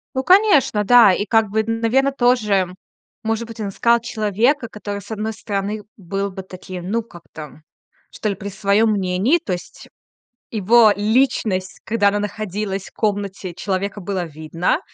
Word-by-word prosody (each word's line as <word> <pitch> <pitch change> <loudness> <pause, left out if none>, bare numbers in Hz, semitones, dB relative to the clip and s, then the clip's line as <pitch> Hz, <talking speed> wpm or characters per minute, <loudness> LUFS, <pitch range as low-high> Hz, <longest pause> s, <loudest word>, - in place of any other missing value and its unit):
Ну, 260 - 0
конечно, 365 - +4
да. 235 -2 +7
И 205 - -1
как 225 +1 +3
бы, 220 +1 +1
наверно, 230 +5 +1
тоже, 235 -7 +2 0.6
может 225 +1 -2
быть, 230 0 -9
он 205 - -2
искал 235 +4 +2
человека, 230 +4 0
который, 205 -1 -6
с 200 - -15
одной 220 0 -3
стороны, 205 0 -4
был 195 +1 -3
бы 190 0 -7
таким, 185 -1 -8
ну, 230 +2 0
как-то, 160 -7 -12 0.5
что 215 - -3
ли, 200 - -1
при 200 0 -7
своём 200 +3 +2
мнении, 195 - +1
то 340 - -5
есть 175 - -7 0.6
его 220 +1 +5
личность, 210 -4 0
когда 215 -2 +2
она 205 +1 0
находилась 205 -1 -4
в - - -23
комнате, 200 -4 -3
человека 195 +3 -3
было 190 -1 -3
видно, 165 - -2
210 Hz, 155 wpm, -20 LUFS, 195-225 Hz, 0.6 s, да